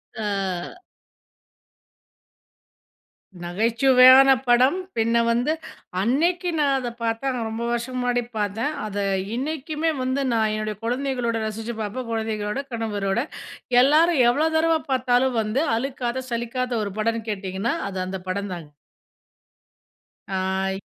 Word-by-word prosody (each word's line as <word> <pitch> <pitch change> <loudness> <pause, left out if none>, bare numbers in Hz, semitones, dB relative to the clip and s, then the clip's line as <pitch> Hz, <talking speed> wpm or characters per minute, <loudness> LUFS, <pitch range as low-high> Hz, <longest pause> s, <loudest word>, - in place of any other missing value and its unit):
ஆ. 195 - -3 2.6
நகைச்சுவையான 255 +8 +6 0.2
படம், 255 +7 +4 0.2
பின்ன 230 +1 +2 0.2
வந்து 245 +6 +1 0.5
அன்னக்கி 340 - +1
நான் 280 -2 +3
அத 250 -2 -3
பார்த்தேன். 230 +4 -1
ஆனா, 245 - -3
ரொம்ப 225 +1 -4
வருஷம் 240 +2 -3
முன்னாடி 245 -1 0
பார்த்தேன். 215 +7 -1
அத 205 -1 -5 0.4
இன்னைக்குமே 310 +4 -2
வந்து 260 +2 0
நான் 220 -2 +2
என்னுடைய 215 0 -3
குழந்தைகளோட 245 -1 -1
ரசிச்சு 225 +2 -5
பார்ப்பேன். 230 +4 -4
குழந்தைகளோட, 220 +1 -2
கணவரோட 210 -2 -1 0.6
எல்லாரும் 305 +2 +4
எவ்ளோ 300 +6 +2
தடவ 325 0 +3 0.2
பார்த்தாலும் 250 -1 +2
வந்து, 215 +7 0
அழுக்காத 255 0 -3
சலிக்காத 240 +2 -2
ஒரு 200 -2 -4
படம்னு 225 +1 -1
கேட்டிங்கன்னா, 195 +3 -2
அது 190 -1 -6
அந்த 190 0 -5
படந்தாங்க. 185 -5 -4 1.6
ஆ 190 0 -1
235 Hz, 110 wpm, -23 LUFS, 210-260 Hz, 2.6 s, நகைச்சுவையான